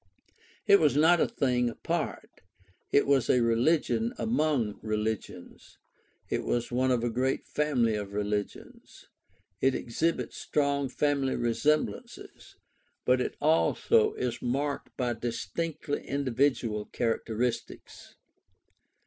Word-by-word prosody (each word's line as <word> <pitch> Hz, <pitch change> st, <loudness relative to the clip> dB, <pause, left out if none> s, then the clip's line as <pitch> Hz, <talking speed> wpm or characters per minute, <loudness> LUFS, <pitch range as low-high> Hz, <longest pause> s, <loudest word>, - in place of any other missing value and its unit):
It 200 Hz, -, +7 dB
was 150 Hz, -5 st, +3 dB
not 160 Hz, +3 st, +5 dB
a -, -, +3 dB
thing 125 Hz, -3 st, 0 dB
apart; -, -, -4 dB, 0.5 s
it 140 Hz, -, +4 dB
was 140 Hz, -3 st, +2 dB
a 125 Hz, -, +4 dB
religion 115 Hz, -1 st, +1 dB
among 120 Hz, -1 st, 0 dB
religions; 105 Hz, -4 st, -4 dB, 0.5 s
it -, -, -2 dB
was 120 Hz, 0 st, -1 dB
one 130 Hz, +2 st, +1 dB
of 125 Hz, -2 st, +1 dB
a 120 Hz, -, +1 dB
great 130 Hz, +3 st, -1 dB
family 130 Hz, -7 st, +1 dB
of 105 Hz, -2 st, -4 dB
religions. 105 Hz, 0 st, -5 dB, 0.6 s
It 135 Hz, 0 st, +3 dB
exhibits 160 Hz, +8 st, -2 dB
strong 140 Hz, -2 st, 0 dB
family 140 Hz, -1 st, 0 dB
resemblances; 120 Hz, 0 st, -2 dB, 0.5 s
but 125 Hz, 0 st, +3 dB
it -, -, -3 dB
also 430 Hz, -, +3 dB
is 120 Hz, -2 st, -3 dB
marked 140 Hz, +4 st, -2 dB
by 125 Hz, -2 st, 0 dB
distinctly 125 Hz, -, -4 dB
individual 130 Hz, -5 st, 0 dB
characteristics. 115 Hz, 0 st, -3 dB
125 Hz, 110 wpm, -28 LUFS, 115-145 Hz, 0.6 s, It